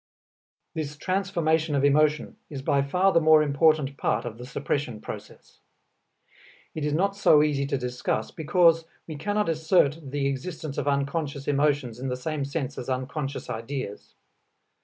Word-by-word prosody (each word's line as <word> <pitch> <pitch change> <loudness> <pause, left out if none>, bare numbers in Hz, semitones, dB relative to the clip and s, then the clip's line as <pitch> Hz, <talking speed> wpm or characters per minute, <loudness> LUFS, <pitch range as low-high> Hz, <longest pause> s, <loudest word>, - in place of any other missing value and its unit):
This 150 -2 -4
transformation 165 -4 0
of 140 - +1
emotion 150 +1 +2
is 135 -3 -6
by 140 0 +2
far 180 +8 +2
the 165 - +4
more 155 -1 +6
important 145 -1 +2
part 110 +3 0
of 115 -1 -6
the 125 - -8
suppression 125 -4 -2
process. - - -10 1.1
It 155 - -4
is 150 0 0
not 195 +5 +1
so 150 -7 +5
easy 140 -2 0
to 140 -1 0
discuss, 125 -1 -2
because 165 +1 +3 0.2
we 155 - -7
cannot 205 +8 -1
assert 160 -1 +2
the 140 0 -1
existence 140 +2 -3
of 145 - -3
unconscious 140 0 -1
emotions 145 -4 +1
in 130 - -4
the 125 -1 -2
same 150 +2 -3
sense 140 -1 -4
as 125 - -6
unconscious 135 +2 -3
ideas. 115 -2 -6
145 Hz, 155 wpm, -26 LUFS, 135-160 Hz, 1.1 s, more